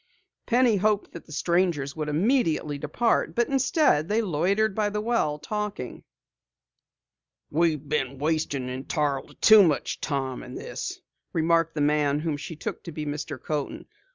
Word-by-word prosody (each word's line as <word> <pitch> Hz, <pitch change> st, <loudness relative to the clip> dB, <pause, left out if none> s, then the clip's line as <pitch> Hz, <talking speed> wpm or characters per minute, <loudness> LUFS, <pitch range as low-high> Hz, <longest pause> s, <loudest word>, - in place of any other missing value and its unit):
Penny 245 Hz, -3 st, +4 dB
hoped 210 Hz, +1 st, +1 dB
that 170 Hz, -, -10 dB
the -, -, -14 dB
strangers 170 Hz, -3 st, 0 dB
would 155 Hz, -1 st, -3 dB
immediately 160 Hz, -, +1 dB
depart, 155 Hz, +11 st, 0 dB
but 240 Hz, 0 st, +1 dB
instead 270 Hz, -, +2 dB
they 215 Hz, +2 st, +2 dB
loitered 200 Hz, +3 st, +1 dB
by 210 Hz, 0 st, 0 dB
the 210 Hz, +1 st, -2 dB
well, 210 Hz, -10 st, 0 dB
talking. 205 Hz, -, -5 dB, 1.5 s
"We've 155 Hz, -2 st, +1 dB
been 140 Hz, -2 st, -1 dB
wasting 145 Hz, -3 st, -1 dB
entirely 135 Hz, +2 st, -2 dB
too 220 Hz, -1 st, +8 dB
much 160 Hz, -7 st, +1 dB
time 135 Hz, -3 st, -2 dB
in 125 Hz, -, -9 dB
this," -, -, -5 dB, 0.3 s
remarked 165 Hz, 0 st, +2 dB
the 150 Hz, -, -1 dB
man 145 Hz, 0 st, +2 dB
whom 160 Hz, -2 st, -1 dB
she 145 Hz, +3 st, -7 dB
took 150 Hz, -, -5 dB
to 170 Hz, -, -6 dB
be 150 Hz, -1 st, -5 dB
Mr. 145 Hz, -1 st, -4 dB
Coaten. 150 Hz, 0 st, -4 dB
155 Hz, 150 wpm, -26 LUFS, 145-205 Hz, 1.5 s, too